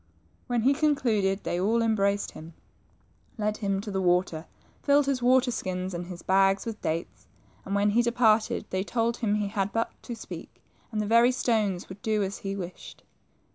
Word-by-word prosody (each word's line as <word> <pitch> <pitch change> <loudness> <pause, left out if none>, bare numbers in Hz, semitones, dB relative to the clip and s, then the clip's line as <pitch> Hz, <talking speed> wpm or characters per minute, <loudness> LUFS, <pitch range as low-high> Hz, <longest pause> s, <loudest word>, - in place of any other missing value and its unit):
When 240 -2 0
he 270 +3 +5
concluded, 235 -10 +1
they 175 - -1
all 230 +4 +2
embraced 200 -2 +1
him, 160 +1 -11 0.8
led 215 -1 -1
him 195 -2 -1
to 210 0 -6
the 190 -1 -1
water, 175 -3 +1 0.3
filled 285 0 +4
his 275 -2 0
water 255 +1 +4
skins, 185 -3 -3
and 175 0 -5
his 180 -2 -9
bags 195 +1 +3
with 225 -2 -6
dates, 165 +1 -4 0.4
and 195 - -2
when 205 +1 +3
he 235 +3 +4
departed 230 -2 +2
they 185 0 0
told 230 +2 -1
him 210 -3 0
he 205 -1 -1
had 200 -1 -1
but 225 0 -1
to 240 - -6
speak 225 - -10 0.3
and 215 -2 -1
the - - -2
very 235 +3 +5
stones 215 -7 0
would 190 +1 -11
do 215 -2 +1
as 195 +1 -4
"he 195 0 -4
wished. 180 -2 -8
210 Hz, 185 wpm, -27 LUFS, 190-235 Hz, 0.8 s, he